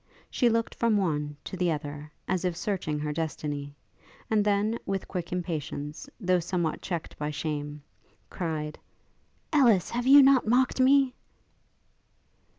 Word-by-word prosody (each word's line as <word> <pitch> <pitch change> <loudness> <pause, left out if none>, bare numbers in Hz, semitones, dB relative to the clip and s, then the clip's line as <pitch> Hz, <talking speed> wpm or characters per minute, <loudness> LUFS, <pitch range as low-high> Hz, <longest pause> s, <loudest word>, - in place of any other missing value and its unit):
She 245 - +3
looked 230 0 0
from 230 -3 +2
one 150 -6 -1
to - - -6
the 180 -1 +1
other, 150 0 -5 0.2
as 185 -1 0
if 180 -2 -1
searching 180 -8 -2
her 150 0 -2
destiny; 145 -2 -4 0.6
and 215 -2 +4
then, 210 +2 +1
with 195 -1 -3
quick 180 -3 -5
impatience, 155 -4 -4
though 185 -4 +2
somewhat 170 -2 -2
checked 170 -4 -5
by 150 0 -2
shame, 150 -1 -4 0.4
cried, 155 -4 -4 0.7
'Ellis! 235 - +4
have 245 +1 -2
you 280 +1 +9
not 265 -4 +5
mocked 255 +3 +2
me?' 265 0 +5
180 Hz, 140 wpm, -28 LUFS, 150-220 Hz, 0.7 s, you